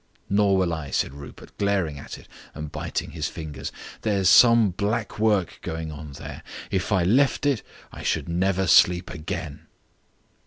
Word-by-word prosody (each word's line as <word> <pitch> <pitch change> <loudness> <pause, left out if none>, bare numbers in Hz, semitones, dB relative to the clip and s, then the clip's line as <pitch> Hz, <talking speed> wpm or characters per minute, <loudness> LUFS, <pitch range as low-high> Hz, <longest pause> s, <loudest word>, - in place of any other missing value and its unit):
"Nor 100 -1 +3
will 90 -3 +1
I," 80 -4 -5
said 65 - -1
Rupert, 70 0 -12
glaring 95 -8 0
at - - -8
it - - -16 0.3
and 75 -1 -6
biting - - -4
his 80 -1 -3
fingers. 75 -5 -6 0.3
"There's 100 -4 +2
some 115 -1 +7
black 105 +4 -2
work 105 -5 +1
going 80 -1 -5
on 75 -1 -9
there. - - -8 0.3
If 95 +2 -1
I 95 -4 +3
left 130 +10 +3
it 140 -6 +2 0.3
I - - -9
should - - -1
never 95 +3 +1
sleep 90 -1 +4
again." 80 -1 -6
90 Hz, 160 wpm, -24 LUFS, 80-100 Hz, 0.3 s, some